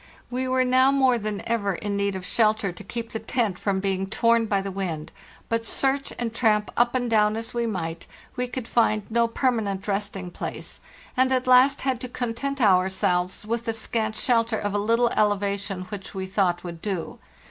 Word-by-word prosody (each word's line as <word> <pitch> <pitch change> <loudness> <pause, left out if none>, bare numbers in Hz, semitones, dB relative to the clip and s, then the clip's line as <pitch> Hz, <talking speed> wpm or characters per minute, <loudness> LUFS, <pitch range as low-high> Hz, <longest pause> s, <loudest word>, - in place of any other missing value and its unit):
We 255 +1 -1
were 255 0 +2
now 255 +1 +4
more 260 -3 +3
than 210 -1 -4
ever 200 -5 0
in 205 +3 -3
need 200 -1 0
of 185 -1 -6
shel 215 +2 +3
ter 200 -3 -3
to 180 - -10
keep 230 +3 -5
the 225 - -3
tent 220 -8 -1
from 195 -2 0
being 195 0 -1
torn 230 +2 +2
by 200 -2 +1
the 195 0 -4
wind, 175 -5 -4 0.4
but, 230 0 0
search 270 +4 0
and 235 -2 -3
tramp 215 -3 +2
up 240 +1 +2
and 245 -1 0
down 215 -2 +3
as 225 0 -5
we 235 -1 0
might, 165 -5 -4 0.3
we 250 0 -1
could 245 -1 -5
find 215 -3 +2
no 235 +1 +3
permanent 220 -5 -1
resting 195 -3 -3
place, - - -6 0.3
and 260 +1 +3
at 255 -1 +1
last 255 +2 +5
had 260 -3 -1
to 250 - -5
content 250 +3 -3
ourselves 185 -2 +2
with 230 +2 -2
the 225 - -1
scant 220 -1 -2
shelter 230 -1 +1
of 205 -1 -2
a 205 - +1
little 230 +3 +3
elevation 200 -3 0
which 195 +1 -8
we 190 -1 -3
thought 185 -2 0
would 170 -2 -7
do. 190 -6 -4
215 Hz, 200 wpm, -25 LUFS, 195-240 Hz, 0.4 s, last